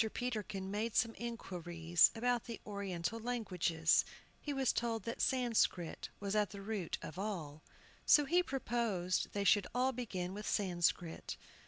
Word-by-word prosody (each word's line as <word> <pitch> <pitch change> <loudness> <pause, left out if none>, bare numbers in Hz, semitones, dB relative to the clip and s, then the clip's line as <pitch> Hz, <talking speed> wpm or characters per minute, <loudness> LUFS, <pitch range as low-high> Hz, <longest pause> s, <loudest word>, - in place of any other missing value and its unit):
Peterkin 210 -6 -3
made 215 +2 -2
some 225 0 +3
inquiries 175 -8 +2
about 245 0 +1
the 230 -3 -6
Oriental 200 0 -3
languages. 180 -9 +2 0.4
He 295 - -3
was 270 -2 +2
told 230 -1 -1
that 230 - -4
Sanscrit 230 -9 +1
was 200 0 -2
at 210 -1 +2
the 200 - -8
root 200 -5 -2
of 155 +4 -7
all. 165 -8 -4 0.4
So 295 - +6
he 350 +5 +4
proposed 230 - -1
they 200 - 0
should 200 0 +4
all 255 +1 +3
begin 190 -8 -4
with 210 +2 -6
Sanscrit. 175 -3 0
210 Hz, 145 wpm, -36 LUFS, 180-235 Hz, 0.4 s, So